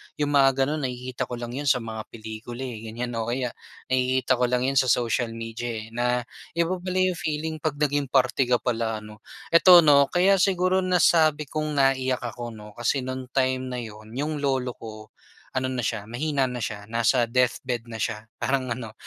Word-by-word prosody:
’yong 145 -1 -1
mga 135 -1 +4
gano’n, 145 -1 -1
nakikita 125 0 -5
ko 125 - -5
lang 120 0 -6
’yon 140 +3 -4
sa 125 -2 +3
mga 110 -1 -6 0.2
pelikula, 110 +3 -7
eh, 115 -3 -6
ganiyan, 120 +2 -4
o 110 - -2
kaya 125 0 -1 0.4
nakikita 130 0 +2
ko - - +2
lang 125 0 0
’yon 135 - +3
sa 130 - +2
social 120 -1 +1
media, 115 +1 -5 0.2
eh, 110 - -13
na 125 +1 0 0.3
iba 170 +2 0
pala 185 +1 -4
'yong 185 -2 +1
feeling 155 +1 -3
pag 155 -3 -2
naging 145 -1 0
parte 130 0 +2
ka 125 - +4
pala, 115 -3 -2
'no? 105 +1 -12 0.3
Eto, 175 +1 +8
'no, 140 -2 +6
kaya 190 +4 +3
siguro 185 -1 +2
nasabi 165 -4 +3
kong 155 +1 -3
naiyak 130 -2 +2
ako, 120 -1 -6
'no, 105 0 -11
kasi 120 +5 -1
no'ng 130 0 -5
time 130 -1 +1
na 125 -1 -4
'yon, 110 0 -11
'yong 150 +2 -2
lolo 135 -3 0
ko, 110 -2 -11 0.5
ano 130 0 0
na 125 - -1
siya, 110 -3 -2
mahina 135 +4 -1
na 125 -1 -4
siya, 105 -2 -4
nasa 115 +2 +2
deathbed 125 0 0
na 115 - -6
siya, 110 0 -3
parang 130 -2 -1
ano, 115 -2 -5
125 Hz, 195 wpm, -25 LUFS, 115-145 Hz, 0.5 s, Eto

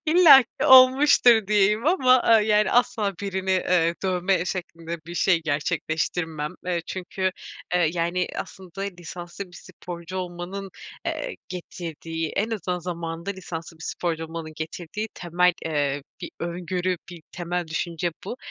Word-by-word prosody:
İllaki 310 -6 +7
olmuştur 255 -4 +7
diyeyim 210 +4 +3
ama, 290 -8 +4
aaa, 225 -1 +6
yani, 210 -1 +3
asla 225 -4 +2
birini, 190 -1 -2
eee, 180 -2 +2
dövme 185 -1 +1
şeklinde 170 -2 -5
bir 170 - -7
şey 175 -1 +3
gerçekleştirmem. 155 +1 -2
Eee, 175 -2 0
çünkü, 185 0 -2 0.4
eee, 170 -3 +3
yani, 175 +1 0
aslında 190 0 -8
lisanslı 175 0 -7
bir 180 - -14
sporcu 175 +1 -8
olmanın, 185 +2 -5 0.4
eee, - - -3
getirdiği 165 -2 -5
en 215 +3 0
azından 185 -5 -2
zamanında 170 0 -5
lisanslı 170 -4 -7
bir 160 - -12
sporcu 165 -2 -2
olmanın 160 -1 -7
getirdiği 175 +7 -5
temel, 180 +1 +2
eee, 145 -3 -1 0.2
bir - - -6
öngörü, 180 +1 -2
bir 170 -3 -10
temel 175 0 -3
düşünce 170 +1 -2
bu. 235 - -5
180 Hz, 135 wpm, -25 LUFS, 165-195 Hz, 0.4 s, İllaki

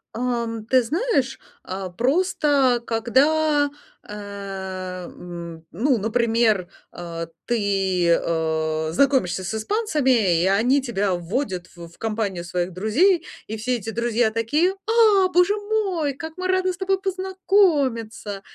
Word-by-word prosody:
Эм, 235 -2 -2
ты 255 +2 +4
знаешь, 285 - 0 0.3
э, 190 0 -4
просто 280 -3 +2
когда, 290 +6 +2 0.4
э, 190 -3 -6
м, 170 -2 -9
ну, 245 - +1
например, 225 -3 +1 0.3
э, 165 -1 -6 0.2
ты, 195 -6 +1
э, 160 -1 0
знакомишься 255 -7 +2
с 195 - -4
испанцами, 255 - +1
и - - +2 0.2
они 265 +3 +3
тебя 205 -6 -1
вводят 185 +1 -3
в 170 -1 -9
в 170 - -21
компанию 210 -5 -2
своих 175 +1 -2
друзей, 320 - +2 0.2
и 220 - -4
все 245 +4 -3
эти 225 -1 -5
друзья 235 0 +1
такие: 295 +12 +1
"А, 430 -4 +5
боже 360 +2 +4
мой, 400 -9 -1
как 320 +3 -7
мы 370 - -2
рады 370 0 +1
с - - -11
тобой 385 0 0
познакомиться!" 345 - 0
230 Hz, 125 wpm, -23 LUFS, 190-310 Hz, 0.4 s, А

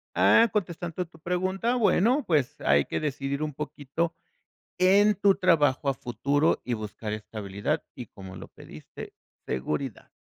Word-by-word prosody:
ah, 230 0 +5
contestando 175 -3 -3
tu 165 -1 -19
pregunta, 185 +7 -1
bueno, 235 +4 +3
pues 150 -9 0
hay 70 0 +3
que - - -3
decidir 140 -1 -3
un 150 -2 -2
poquito 150 +3 -3 0.6
en 200 +3 +5
tu 200 0 +3
trabajo 150 -7 +2
a 135 - +2
futuro 140 +4 0
y 125 - -1
buscar 105 0 -6
estabilidad 105 -2 -3
y, 125 - -8
como 95 -2 -11
lo - - -9
pediste, - - -11 0.3
seguridad. 75 - -3
150 Hz, 140 wpm, -27 LUFS, 120-185 Hz, 0.6 s, ah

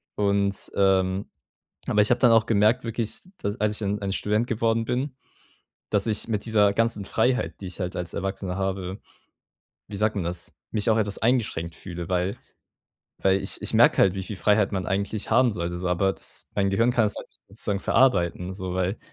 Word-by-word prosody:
Und, 100 -1 0
ähm 95 0 +2 0.6
aber 105 - +3
ich 105 - +2
habe 120 - +3
dann 120 -2 +5
auch 115 -1 +4
gemerkt 110 +3 +3
wirklich, 115 -1 -3 0.2
d 100 - 0
als 105 0 +1
ich - - -3
dann 105 -1 -2
ein 100 -1 -2
Student 105 +4 0
geworden 115 0 +1
bin, 130 +3 -2 0.8
dass 105 0 +2
ich 110 0 -1
mit 105 -3 -1
dieser 105 -3 +4
ganzen 115 -2 +1
Freiheit, 125 +5 0
die 95 - -6
ich 90 +2 -8
halt 90 0 -3
als 90 -1 -4
Erwachsener 95 -1 -3
habe, 95 0 -3 0.9
wie 105 - -7
sagt 105 +2 +1
man 100 - -1
das, 85 0 -5 0.2
mich 105 0 0
auch 110 - +4
etwas 105 -2 -1
eingeschränkt 110 -9 0
fühle, 85 -1 -7
weil 90 +1 0 0.9
weil 95 0 +3
ich - - -2
ich - - -3
merke - - +5
halt, 95 -1 +4
wie 95 - -3
viel 100 +1 -6
Freiheit 105 0 +3
man 95 -2 -2
eigentlich 100 +2 -2
haben 120 +1 +5
sollte 85 -3 -3
so, 90 +1 -3
aber 95 +2 +2
das - - -6
mein 100 -1 +2
Gehirn 115 +5 +2
kann 120 -2 +3
es 105 - -5
halt - - -8
nicht - - -29
sozusagen 100 0 -2
verarbeiten 90 -7 +2
so, 95 -1 -5
weil 95 +3 0
100 Hz, 200 wpm, -25 LUFS, 95-110 Hz, 0.9 s, dann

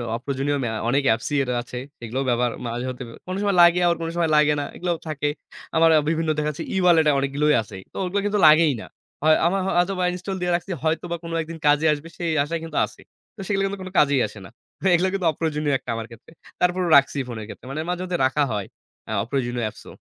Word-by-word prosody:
অপ্রয়োজনীয় 140 +3 -2
ম্যা 110 - -2 0.2
অনেক 140 +2 +2
অ্যাপস 110 0 +1
ই 135 - +1
আছে। 125 0 -7 0.2
সেগুলো 120 +2 -4
ব্যাবহার 120 0 +1 0.2
মাঝে-মধ্যে 125 +2 -4 0.2
কোনো 185 +1 -3
সময় 200 -2 +1
লাগে 175 +1 +6
আর 170 - +3
কোনো 165 - -3
সময় 170 -2 +1
লাগে 150 0 +4
না, 145 - -2
এগুলোও 175 -1 -2
থাকে। 150 -1 -1 0.5
আমার 165 0 +5
আ - - +5
বিভিন্ন 165 -1 0
দেখা 150 0 0
যাচ্ছে 145 - -6
ই-ওয়ালেট 175 -4 +4
এ - - +5
অনেকগুলোই 145 +2 +1
আছে, 105 -2 -11 0.2
তো - - -9
ওগুলো 185 +2 -1
কিন্তু 205 0 +1
লাগেই 155 -1 +6
না। - - -10 0.4
হয় 155 0 +6
আমার 195 +2 0
হয়তোবা 180 +1 +1
ইনস্টল 180 +2 -5
দিয়ে 180 0 0
রাখছি, 175 +3 -4
হয়তোবা 165 +2 -1
কোন 165 - -7
একদিন 165 +1 -7
কাজে 145 +2 +4
আসবে 150 +2 -7
সেই 170 -2 -1
আশায় 165 +3 -3
কিন্তু 165 - -6
আছে। - - -15 0.3
তো - - -19
সেগুলো 195 -1 0
কিন্তু 195 0 -4
কোন 185 - -7
কাজেই 140 -3 +4
আসে 105 - -12
না। - - -11 0.4
এগুলো 180 +2 +3
কিন্তু 195 -2 -1
অপ্রয়োজনীয় 150 -2 -1
একটা - - -13
আমার 115 - -4
ক্ষেত্রে। 115 +6 -15 0.3
তারপরও 180 0 +1
রাখছি 140 +1 +2
ফোনের 110 -3 -6
ক্ষেত্রে। 120 - -11
মানে 155 +3 -3
মাঝে-মধ্যে 180 0 -2
রাখা 145 +3 +2
হয়, 100 -2 -3 0.4
অ্যা 110 - -4
অপ্রয়োজনীয় 120 -1 -2
অ্যাপসও। 105 - -8
155 Hz, 215 wpm, -23 LUFS, 135-175 Hz, 0.5 s, লাগে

